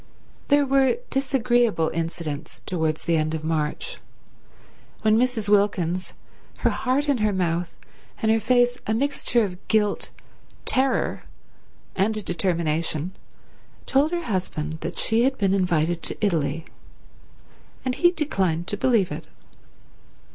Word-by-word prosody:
There 285 0 +4
were 270 - +3
disagreeable 245 - +2
incidents 165 -2 -5
towards 160 -3 -1
the 165 -1 +2
end 155 +1 0
of 155 - -5
March, 160 - -2 1.0
when 215 -1 +4
Mrs. 235 -3 +1
Wilkins, 185 -3 +1 0.5
her - - +3
heart 270 +4 0
in 280 -4 +2
her 215 0 +2
mouth 175 -2 -1 0.4
and 220 - +2
her 225 - +3
face 245 +2 +2
a 220 - +1
mixture 255 -2 +1
of 185 -2 -6
guilt, 210 -2 +1 0.6
terror 265 +1 +1 0.7
and 205 +3 +1
determination, 170 -1 -1 0.7
told 280 +3 +3
her 345 0 -2
husband 175 - -3
that - - -5
she 225 +1 +3
had 265 +2 +2
been 195 -2 +2
invited 175 -3 +1
to - - -1
Italy, 165 -5 0 1.2
and 255 - 0
he 300 +7 +4
declined 195 - 0
to 205 - -1
believe 220 -7 +2
it. 155 +1 -6
200 Hz, 125 wpm, -24 LUFS, 165-250 Hz, 1.2 s, There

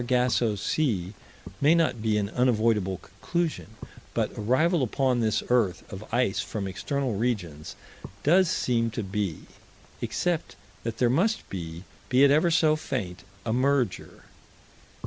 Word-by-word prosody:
Our 120 - -6
Super - - -10
Sargasso 120 -3 +2
Sea 100 - -1 0.5
may 150 +4 +5
not 160 -9 +1
be 110 -1 +1
an 100 0 -1
unavoidable 110 -6 +2
conclusion, 165 - -3 0.5
but - - 0
arrival 150 - +2
upon 130 0 +1
this 110 -2 +1
earth 115 -7 +2
of 95 +4 -9
ice 120 -4 +1
from 105 -3 -3
external 130 +6 -2
regions 95 -9 -3 0.5
does 175 +4 +4
seem 115 -6 +1
to 115 - -1
be 95 -4 -3 0.6
except 175 -2 -2 0.3
that 115 -1 -4
there 120 -2 +3
must 210 - +1
be, 85 -2 -6 0.3
be 130 +2 +5
it 140 - +6
ever 155 +4 +4
so 155 -2 +4
faint, 110 -12 -4 0.2
a 110 - 0
merger. 130 -4 0
120 Hz, 145 wpm, -27 LUFS, 100-140 Hz, 0.6 s, it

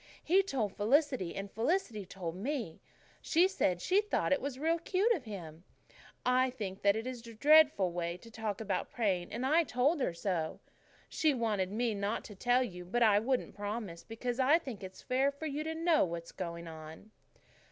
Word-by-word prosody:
"He 370 +4 +4
told 255 - -2
Felicity 255 - +1
and 195 0 -5
Felicity 225 - -1
told 175 -3 -5
me. 230 - -4 0.4
She 345 +3 +4
said 180 - 0
she 385 +3 +3
thought 420 -8 0
it 280 - 0
was 275 -2 -4
real 325 +4 +1
cute 390 +7 +2
of 300 - -4
him. 170 -6 -8 0.6
I 255 +1 +3
think 205 -7 -6
that 200 0 +4
is 235 +1 -5
a 230 - -10
dreadful 290 - +5
way 170 0 -3
to 230 +5 -15
talk 215 -3 -3
about 195 -4 -2
praying 190 -7 -1
and 245 - -3
I 320 +5 +4
told 285 +3 +1
her 175 - 0
so. 170 -3 -2 0.5
She 310 -3 +1
wanted 210 -6 0
me 235 +3 0
to 200 - -5
promise - - -5
not 205 +3 -1
to 210 - -10
tell 245 +5 +2
you, 180 -7 -6
but 235 +7 +1
I 210 -2 +5
wouldn't 255 +3 -1
promise, 205 -4 -5
because 240 +2 -4
I 275 +5 +5
think 260 - -8
it's 190 0 -9
fair 265 +2 +2
for 280 +3 -8
you 300 0 -2
to 320 0 -3
know 330 -1 +3
what 170 -2 -3
is - - -13
going 170 0 -6
on." 160 +5 -10
230 Hz, 200 wpm, -32 LUFS, 190-280 Hz, 0.6 s, dreadful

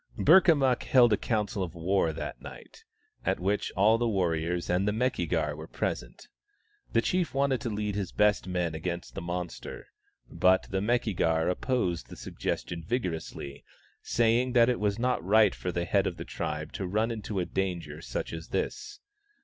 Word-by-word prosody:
Burkamukk 150 -9 +5
held 120 -4 +5
a - - +6
council 105 -2 -1
of 90 -2 -4
war 85 0 +1
that - - -6
night, - - -12 0.4
at - - 0
which 100 +3 -1
all 110 +4 +4
the 120 - +1
warriors 85 -3 0
and 90 +3 +1
the - - +3
Meki 110 -6 0
gar 75 -4 0
were 75 +1 -8
present. - - -4 0.6
The - - +2
chief 180 -6 0
wanted 135 -3 +1
to - - -2
lead 105 -1 -2
his 100 -3 -3
best 105 -2 +2
men 90 -3 -1
against 85 +2 -4
the - - -5
monster, 85 0 -6 0.4
but 95 0 +3
the 95 0 0
Meki 115 -1 0
gar 80 -1 +2
opposed 90 -4 -1
the - - -9
suggestion 75 +8 -4
vigorously, 80 - -4 0.4
saying 120 +2 +2
that 120 -1 +5
it 125 - 0
was 105 -1 0
not 125 -5 0
right 105 +2 +5
for 90 - -4
the 85 0 -2
head - - +2
of - - -4
the - - -6
tribe 75 +1 -4
to 95 - -3
run 110 +5 0
into 105 -3 -4
a 90 - 0
danger 90 -3 -3
such - - -4
as 80 0 -6
this. 415 - -4
95 Hz, 180 wpm, -29 LUFS, 85-115 Hz, 0.6 s, a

